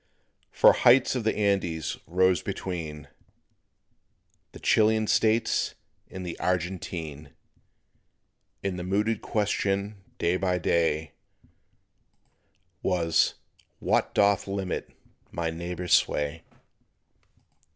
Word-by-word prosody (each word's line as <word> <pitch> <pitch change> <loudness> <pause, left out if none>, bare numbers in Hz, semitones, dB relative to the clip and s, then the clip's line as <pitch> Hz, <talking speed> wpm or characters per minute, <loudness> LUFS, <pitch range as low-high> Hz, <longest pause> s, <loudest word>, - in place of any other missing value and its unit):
For - - +6
heights 125 +1 +5
of 125 -3 -2
the 110 - +1
Andes 95 -6 0
rose 90 0 +2
between 80 -5 -5 1.4
The - - -12
Chilean 110 0 +3
States 110 +2 +1 0.3
and 95 -1 -7
the 85 - -6
Argentine; 85 -5 -3 1.3
And 95 -2 -2
the - - -4
mooted 105 +4 0
question, 100 -1 -1
day 85 +2 +1
by 90 -1 0
day, 80 -3 0 1.7
Was 85 -3 +2 0.4
"What - - 0
doth 100 0 +3
limit 95 -1 -3 0.4
my 85 -1 -3
neighbor's 85 +1 -3
sway?" 75 +2 +2
90 Hz, 90 wpm, -27 LUFS, 85-100 Hz, 1.7 s, For